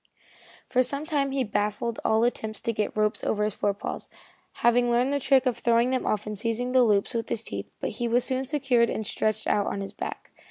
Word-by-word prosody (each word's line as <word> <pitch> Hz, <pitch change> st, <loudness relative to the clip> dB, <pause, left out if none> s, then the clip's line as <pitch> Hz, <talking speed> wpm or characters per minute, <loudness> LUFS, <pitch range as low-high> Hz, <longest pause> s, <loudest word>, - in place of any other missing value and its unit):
For 255 Hz, -, +3 dB
some 280 Hz, +4 st, -2 dB
time 285 Hz, -3 st, 0 dB
he 270 Hz, -1 st, 0 dB
baffled 210 Hz, +2 st, -2 dB
all 220 Hz, +1 st, +3 dB
attempts 220 Hz, -2 st, -1 dB
to 230 Hz, -, -1 dB
get 215 Hz, 0 st, -2 dB
ropes 215 Hz, 0 st, +1 dB
on -, -, 0 dB
his 210 Hz, 0 st, 0 dB
forepaws, 200 Hz, 0 st, -2 dB, 0.6 s
having 240 Hz, +1 st, +4 dB
learned 245 Hz, +3 st, +2 dB
the 285 Hz, -, +1 dB
trick 265 Hz, -1 st, +3 dB
of 250 Hz, -2 st, 0 dB
throwing 235 Hz, +1 st, +3 dB
them 260 Hz, -, -1 dB
off 210 Hz, -1 st, 0 dB
and 210 Hz, 0 st, -4 dB
seizing 230 Hz, +4 st, -2 dB
the 255 Hz, 0 st, +5 dB
loops 210 Hz, -1 st, +2 dB
with 230 Hz, -1 st, -2 dB
his 230 Hz, -1 st, -2 dB
teeth, -, -, -5 dB
but -, -, -2 dB
he 240 Hz, -, -2 dB
was 240 Hz, +1 st, +2 dB
soon 260 Hz, 0 st, -1 dB
secured 255 Hz, -5 st, +2 dB
and 220 Hz, -, -3 dB
stretched 215 Hz, +1 st, -1 dB
out 205 Hz, -, +1 dB
on -, -, -2 dB
his 195 Hz, -, -6 dB
back. -, -, -6 dB
235 Hz, 225 wpm, -26 LUFS, 215-255 Hz, 0.6 s, the